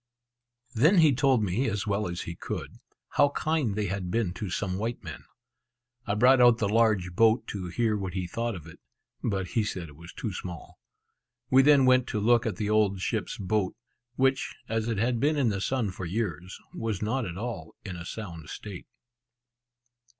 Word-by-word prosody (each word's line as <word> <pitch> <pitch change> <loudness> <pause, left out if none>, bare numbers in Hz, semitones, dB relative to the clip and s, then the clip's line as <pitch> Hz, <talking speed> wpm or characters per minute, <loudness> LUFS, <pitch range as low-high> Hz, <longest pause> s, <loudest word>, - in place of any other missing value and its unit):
Then 155 - +4
he 160 -4 +6
told 130 -3 +3
me 105 +7 0
as 105 +1 -2
well 100 -1 0
as 85 0 -4
he 85 - -5
could, - - -6 0.3
how 145 - +4
kind 150 -7 0
they 105 -1 -1
had 95 -1 -3
been 100 -3 0
to 105 0 -5
some 95 0 -2
white 115 +2 -3
men. - - -8 0.8
I 100 - 0
brought 125 +4 +5
out 120 -2 +7
the 110 - 0
large 105 -4 +2
boat 115 +4 +4
to 95 -3 -4
hear 110 +5 0
what 95 -3 -4
he 95 -1 -1
thought 115 +5 -3
of 85 -4 -9
it, 80 - -13 0.4
but 95 -4 -1
he 115 -3 +1
said 90 -6 -4
it 70 - -14
was 85 +3 -11
too 110 - -5
small. 90 -2 -8 0.7
We 130 +1 +7
then 140 -1 +6
went 130 -1 +4
to 105 - -2
look 115 +2 +3
at 110 - -2
the 105 -2 -2
old 105 -2 +2
ship's - - -2
boat, 100 -1 -1 0.4
which, 135 +1 +1
as 115 0 -1
it 115 -3 -1
had 120 +2 +1
been 150 +3 +2
in 130 -5 +3
the 100 -2 -2
sun 120 -3 0
for 95 -1 -6
years, 90 -2 -3 0.2
was 110 -3 -3
not 120 +5 0
at 85 0 -6
all 100 -8 -5
in 95 -3 -5
a 85 - -7
sound 85 -5 -7
state. 100 -4 -8
105 Hz, 195 wpm, -28 LUFS, 95-120 Hz, 0.8 s, out